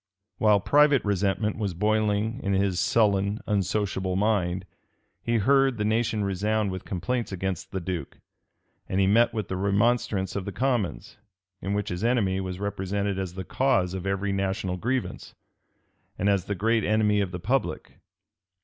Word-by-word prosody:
While 105 Hz, -2 st, +5 dB
private 145 Hz, +4 st, +4 dB
resentment 100 Hz, +1 st, 0 dB
was 100 Hz, -5 st, -2 dB
boiling 110 Hz, +3 st, +1 dB
in 100 Hz, -, -1 dB
his 95 Hz, -2 st, +1 dB
sullen, 100 Hz, -1 st, +2 dB
unsociable 95 Hz, -2 st, -1 dB
mind, 95 Hz, -3 st, 0 dB, 0.6 s
he 115 Hz, 0 st, 0 dB
heard 135 Hz, +2 st, +3 dB
the 105 Hz, -, -1 dB
nation 110 Hz, -1 st, +1 dB
resound 100 Hz, +2 st, 0 dB
with 95 Hz, 0 st, -6 dB
complaints 115 Hz, +6 st, -2 dB
against 95 Hz, -1 st, -4 dB
the 95 Hz, -, -2 dB
duke; 90 Hz, -1 st, -5 dB, 0.7 s
and 95 Hz, -, 0 dB
he 95 Hz, -, +4 dB
met 115 Hz, +5 st, +4 dB
with 110 Hz, -4 st, -3 dB
the 95 Hz, -, -3 dB
remonstrance 100 Hz, -1 st, +1 dB
of 100 Hz, -2 st, -3 dB
the 100 Hz, -, -4 dB
commons, 120 Hz, -4 st, -2 dB, 0.4 s
in 100 Hz, +2 st, -2 dB
which 105 Hz, 0 st, -2 dB
his 90 Hz, +3 st, -4 dB
enemy 105 Hz, -6 st, +1 dB
was 95 Hz, -1 st, -5 dB
represented 100 Hz, 0 st, -2 dB
as 90 Hz, -2 st, -4 dB
the 95 Hz, -, -4 dB
cause 95 Hz, -9 st, +1 dB
of 95 Hz, 0 st, -4 dB
every 100 Hz, +1 st, -1 dB
national 95 Hz, -1 st, -1 dB
grievance, 125 Hz, +6 st, -3 dB, 0.8 s
and 100 Hz, -, +1 dB
as 100 Hz, -2 st, +1 dB
the 100 Hz, -, -2 dB
great 115 Hz, +4 st, +1 dB
enemy 105 Hz, -1 st, +2 dB
of 100 Hz, -, -1 dB
the 90 Hz, 0 st, -6 dB
public. 125 Hz, +9 st, -2 dB
100 Hz, 160 wpm, -26 LUFS, 95-110 Hz, 0.8 s, While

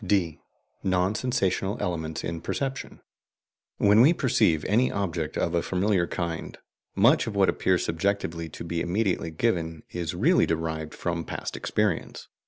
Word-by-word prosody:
(d) 90 Hz, -5 st, 0 dB, 0.4 s
NON 95 Hz, +1 st, +1 dB
SENSATIONAL 105 Hz, -5 st, 0 dB
ELEMENTS 80 Hz, -3 st, -3 dB
IN 85 Hz, 0 st, -4 dB
PERCEPTION. 135 Hz, +8 st, -4 dB, 0.8 s
When 105 Hz, +2 st, +5 dB
we 150 Hz, +7 st, +7 dB
perceive 85 Hz, -, +2 dB
any 115 Hz, +6 st, +2 dB
object 85 Hz, -6 st, -2 dB
of 85 Hz, -, 0 dB
a 85 Hz, -, +2 dB
familiar 90 Hz, -1 st, +1 dB
kind, 85 Hz, 0 st, -4 dB, 0.4 s
much -, -, +4 dB
of 110 Hz, -, -4 dB
what 100 Hz, -1 st, +4 dB
appears 95 Hz, -1 st, +1 dB
subjectively 85 Hz, -1 st, -1 dB
to -, -, -8 dB
be 85 Hz, 0 st, -2 dB
immediately 90 Hz, -1 st, 0 dB
given 80 Hz, -3 st, -1 dB
is 85 Hz, -3 st, -3 dB
really -, -, +3 dB
derived 80 Hz, -1 st, -3 dB
from 85 Hz, -1 st, -2 dB
past -, -, -5 dB
experience. -, -, -2 dB
90 Hz, 145 wpm, -26 LUFS, 80-100 Hz, 0.8 s, we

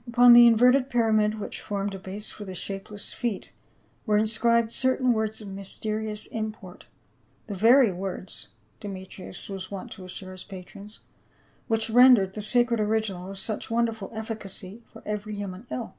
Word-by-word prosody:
Upon 240 Hz, +1 st, +7 dB
the 240 Hz, 0 st, +9 dB
inverted 250 Hz, +3 st, +4 dB
pyramid 220 Hz, -3 st, +2 dB
which -, -, -6 dB
formed 200 Hz, -1 st, -3 dB
a 195 Hz, -, -6 dB
base 195 Hz, +3 st, -5 dB
for 210 Hz, -, -9 dB
the 190 Hz, -2 st, -7 dB
shapeless 200 Hz, +2 st, -5 dB
feet 235 Hz, -6 st, -4 dB, 0.6 s
were 210 Hz, -1 st, +3 dB
inscribed 225 Hz, +1 st, +2 dB
certain 255 Hz, 0 st, +2 dB
words 220 Hz, 0 st, -2 dB
of -, -, -9 dB
mysterious 210 Hz, +2 st, -4 dB
import. 215 Hz, -4 st, -7 dB, 0.3 s
' -, -, -38 dB
The 210 Hz, -, -5 dB
very 230 Hz, +4 st, +5 dB
words,' 185 Hz, +1 st, -6 dB, 0.3 s
De 210 Hz, -, -8 dB
metrius 190 Hz, -1 st, -6 dB
was 190 Hz, -2 st, -6 dB
wont 195 Hz, -2 st, -7 dB
to 190 Hz, -, -9 dB
assure 185 Hz, +1 st, -8 dB
his 185 Hz, -1 st, -9 dB
patrons, 200 Hz, +2 st, -11 dB, 0.3 s
' -, -, -36 dB
which 225 Hz, 0 st, +1 dB
ren 250 Hz, +2 st, +8 dB
dered 190 Hz, -3 st, -1 dB
the 210 Hz, -, -5 dB
sacred 240 Hz, +2 st, +2 dB
original 210 Hz, -4 st, -1 dB
of 195 Hz, -, -8 dB
such 215 Hz, +2 st, -3 dB
wonderful 225 Hz, -3 st, -1 dB
efficacy 220 Hz, -2 st, -6 dB
for -, -, -14 dB
every 210 Hz, 0 st, -4 dB
human 200 Hz, +2 st, -7 dB
ill.' 235 Hz, -, -4 dB
215 Hz, 175 wpm, -26 LUFS, 195-230 Hz, 0.6 s, the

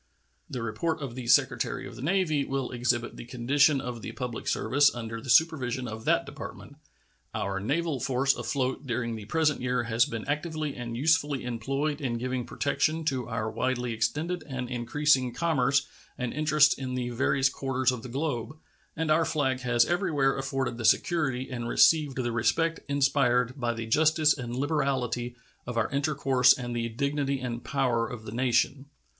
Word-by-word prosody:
The 125 Hz, -, -4 dB
report 160 Hz, +9 st, -2 dB
of 135 Hz, -5 st, -5 dB
the 125 Hz, -1 st, -7 dB
Secretary -, -, +2 dB
of -, -, -10 dB
the -, -, -9 dB
Navy 155 Hz, -2 st, +1 dB
will 135 Hz, -2 st, -3 dB
exhibit 120 Hz, -1 st, -1 dB
the -, -, -8 dB
condition 135 Hz, +4 st, +2 dB
of 125 Hz, -3 st, -5 dB
the -, -, -6 dB
public 125 Hz, -2 st, -5 dB
service 145 Hz, +6 st, +3 dB
under 115 Hz, -1 st, -5 dB
the 130 Hz, -, -9 dB
supervision 130 Hz, -5 st, +3 dB
of 110 Hz, 0 st, -7 dB
that -, -, +2 dB
Department. -, -, -9 dB, 0.6 s
Our 100 Hz, 0 st, -2 dB
naval 145 Hz, +7 st, -1 dB
force 135 Hz, +2 st, +1 dB
afloat 130 Hz, 0 st, -2 dB
during 115 Hz, -1 st, -2 dB
the 110 Hz, -2 st, -8 dB
present 155 Hz, +3 st, +1 dB
year 125 Hz, -1 st, 0 dB
has 115 Hz, +1 st, +2 dB
been 115 Hz, -1 st, -5 dB
actively 155 Hz, 0 st, -2 dB
and 120 Hz, -1 st, -5 dB
usefully 145 Hz, -1 st, +2 dB
employed 135 Hz, +6 st, -2 dB
in 120 Hz, -4 st, -1 dB
giving 125 Hz, 0 st, -3 dB
protection 155 Hz, +5 st, 0 dB
to 130 Hz, -5 st, -1 dB
our 110 Hz, -1 st, -2 dB
widely 125 Hz, 0 st, -1 dB
extended 155 Hz, +10 st, -1 dB
and 130 Hz, -3 st, -5 dB
increasing 130 Hz, +1 st, +1 dB
commerce 140 Hz, -4 st, +1 dB, 0.3 s
and 125 Hz, -1 st, -3 dB
interests 150 Hz, -1 st, +4 dB
in 130 Hz, -1 st, -5 dB
the 125 Hz, -1 st, -2 dB
various 135 Hz, +2 st, +2 dB
quarters 130 Hz, -2 st, 0 dB
of 125 Hz, -2 st, -5 dB
the 125 Hz, -, -8 dB
globe, 140 Hz, 0 st, -3 dB, 0.4 s
and 160 Hz, -1 st, -1 dB
our 160 Hz, +2 st, +4 dB
flag 145 Hz, -5 st, 0 dB
has 125 Hz, -2 st, +3 dB
everywhere 160 Hz, -7 st, +1 dB
afforded 135 Hz, -3 st, -2 dB
the -, -, -4 dB
security 135 Hz, -1 st, +2 dB
and 120 Hz, -2 st, -4 dB
received 150 Hz, +2 st, +4 dB
the 120 Hz, -2 st, -1 dB
respect 120 Hz, +9 st, +1 dB
inspired 135 Hz, -2 st, +2 dB
by 120 Hz, -1 st, 0 dB
the 115 Hz, -1 st, -5 dB
justice 155 Hz, +5 st, +3 dB
and 120 Hz, -3 st, -5 dB
liberality 130 Hz, -4 st, -1 dB, 0.3 s
of 125 Hz, -1 st, -4 dB
our 115 Hz, +4 st, 0 dB
intercourse 135 Hz, -3 st, +3 dB
and 120 Hz, -1 st, -5 dB
the 115 Hz, 0 st, -1 dB
dignity 140 Hz, +3 st, -1 dB
and 120 Hz, -2 st, -4 dB
power 125 Hz, -4 st, 0 dB
of 115 Hz, -3 st, -8 dB
the 105 Hz, -, -7 dB
nation. 130 Hz, +3 st, +1 dB
130 Hz, 175 wpm, -28 LUFS, 120-145 Hz, 0.6 s, interests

